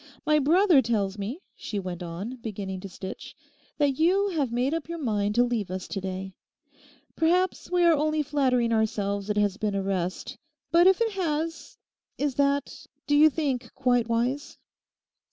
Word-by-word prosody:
'My 305 Hz, 0 st, +4 dB
brother 330 Hz, +1 st, +5 dB
tells 210 Hz, -4 st, -1 dB
me,' 235 Hz, -, -5 dB
she 210 Hz, -, -5 dB
went 180 Hz, -2 st, -5 dB
on, 180 Hz, +9 st, -6 dB
beginning 200 Hz, -5 st, -5 dB
to 195 Hz, -, -8 dB
stitch, 190 Hz, +1 st, -8 dB, 0.4 s
'that 285 Hz, -2 st, +1 dB
you 385 Hz, +5 st, +3 dB
have 295 Hz, -9 st, -1 dB
made 250 Hz, +5 st, 0 dB
up 330 Hz, -1 st, -3 dB
your 335 Hz, -, -4 dB
mind 210 Hz, -7 st, -1 dB
to 245 Hz, -, +5 dB
leave 235 Hz, -6 st, -1 dB
us 185 Hz, 0 st, -5 dB
to 195 Hz, -, -4 dB
day. 190 Hz, 0 st, -5 dB, 0.8 s
Perhaps 360 Hz, +3 st, +1 dB
we 360 Hz, -1 st, +2 dB
are 340 Hz, -1 st, +6 dB
only 305 Hz, 0 st, +1 dB
flattering 255 Hz, -5 st, +1 dB
ourselves 205 Hz, -2 st, -1 dB
it 210 Hz, -, 0 dB
has 205 Hz, -1 st, +1 dB
been 210 Hz, -2 st, -1 dB
a 195 Hz, -, -1 dB
rest. 185 Hz, -2 st, -3 dB, 0.3 s
But 340 Hz, +2 st, +6 dB
if 380 Hz, +3 st, +4 dB
it 455 Hz, -1 st, +2 dB
has—is 320 Hz, -4 st, -4 dB
that, 280 Hz, +1 st, -1 dB, 0.2 s
do 290 Hz, -, +2 dB
you 305 Hz, +2 st, +7 dB
think, 265 Hz, -6 st, -2 dB
quite 245 Hz, -3 st, +2 dB
wise? 245 Hz, +5 st, -1 dB
250 Hz, 170 wpm, -26 LUFS, 205-310 Hz, 0.8 s, you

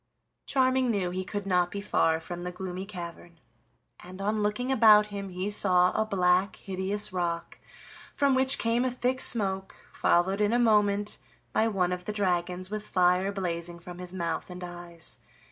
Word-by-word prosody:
Charming 260 Hz, -1 st, +2 dB
knew 195 Hz, -5 st, 0 dB
he 185 Hz, +1 st, -3 dB
could 205 Hz, +1 st, -5 dB
not 180 Hz, -2 st, +2 dB
be 200 Hz, -, -5 dB
far 165 Hz, -5 st, +1 dB
from 175 Hz, +2 st, -7 dB
the 180 Hz, 0 st, -4 dB
Gloomy 185 Hz, +1 st, -6 dB
Cavern, 170 Hz, -3 st, -9 dB, 0.6 s
and 185 Hz, +1 st, -11 dB
on 210 Hz, +2 st, 0 dB
looking 210 Hz, +5 st, -1 dB
about 215 Hz, -4 st, +7 dB
him 200 Hz, -1 st, -5 dB
he 185 Hz, +2 st, -4 dB
saw 185 Hz, -3 st, +3 dB
a 220 Hz, -, +2 dB
black 185 Hz, -1 st, +2 dB
hideous 195 Hz, +1 st, -3 dB
rock 170 Hz, -2 st, -3 dB, 0.6 s
from 280 Hz, -1 st, +3 dB
which 265 Hz, +1 st, +3 dB
came 230 Hz, +1 st, +1 dB
a 255 Hz, -, +1 dB
thick 250 Hz, +1 st, -1 dB
smoke, 195 Hz, -4 st, 0 dB, 0.2 s
followed 190 Hz, +4 st, +2 dB
in 210 Hz, +2 st, +2 dB
a -, -, +4 dB
moment 210 Hz, -3 st, +2 dB, 0.3 s
by 220 Hz, -, +3 dB
one 185 Hz, -5 st, 0 dB
of 180 Hz, 0 st, -4 dB
the 210 Hz, -, -3 dB
dragons 180 Hz, -2 st, -1 dB
with 215 Hz, 0 st, -4 dB
fire 180 Hz, +2 st, +2 dB
blazing 175 Hz, -3 st, -3 dB
from 175 Hz, +1 st, -10 dB
his 180 Hz, -1 st, -5 dB
mouth 170 Hz, -3 st, -3 dB
and 180 Hz, 0 st, -8 dB
eyes. 175 Hz, -1 st, -6 dB
190 Hz, 175 wpm, -28 LUFS, 180-210 Hz, 0.6 s, about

